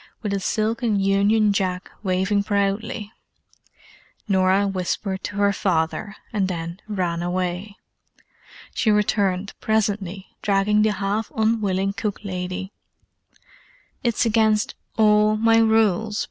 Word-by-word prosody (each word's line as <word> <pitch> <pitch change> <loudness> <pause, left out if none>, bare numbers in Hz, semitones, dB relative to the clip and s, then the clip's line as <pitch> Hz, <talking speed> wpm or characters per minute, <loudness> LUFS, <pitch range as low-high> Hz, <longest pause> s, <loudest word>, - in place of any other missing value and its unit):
with 205 -2 -1
a 200 - 0
silken 220 +2 0
Union 200 +2 +3
Jack 185 -1 -2
waving 190 +1 +1
proudly. 205 +1 -1 1.2
Norah 190 0 +3
whispered 190 0 -2
to 205 - -5
her 200 0 +2
father, 185 +2 -1 0.2
and 200 -3 +1
then 170 0 -5
ran 180 -5 -2
away. 180 +3 -3 1.0
She 220 - +1
returned, 200 -2 +1
presently, 200 -3 -1
dragging 205 +1 +2
the 215 0 +3
half 205 +2 -2
unwilling 205 -3 +1
cook 205 0 -3
lady. 185 0 -4 1.3
"It's 235 -1 +1
against 220 -1 +2 0.2
all 215 0 +4
my 225 +1 +4
rules!" 220 -1 +2
200 Hz, 110 wpm, -23 LUFS, 190-215 Hz, 1.3 s, all